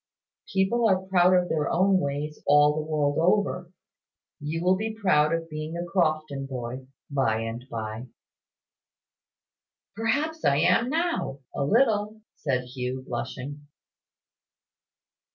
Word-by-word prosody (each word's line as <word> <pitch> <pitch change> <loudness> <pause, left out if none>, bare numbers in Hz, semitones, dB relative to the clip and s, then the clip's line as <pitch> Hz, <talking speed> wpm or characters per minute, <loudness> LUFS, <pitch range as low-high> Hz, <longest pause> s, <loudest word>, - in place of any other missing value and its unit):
"People 200 +5 +2
are 190 - +4
proud 185 -1 +4
of 180 -1 +2
their 155 -3 0
own 190 +2 +3
ways 145 0 -3
all 145 +1 +6
the 155 - -2
world 150 -1 0
over. 180 0 +1 0.7
You 160 +3 -3
will 185 +1 +4
be 220 +2 -4
proud 155 -7 +3
of 165 0 -1
being 155 +1 -5
a 175 - -3
Crofton 155 -6 0
boy, 130 0 -6 0.2
by 120 -6 +1
and 115 +2 -5
by." 110 +1 -5 1.9
"Perhaps 290 +9 -1
I 140 - +3
am 230 - +3
now, 325 - -1
a - - -1
little," 215 - +2 0.2
said 130 -4 -1
Hugh, 125 +1 -5
blushing. 140 +4 -5
155 Hz, 125 wpm, -26 LUFS, 140-190 Hz, 1.9 s, all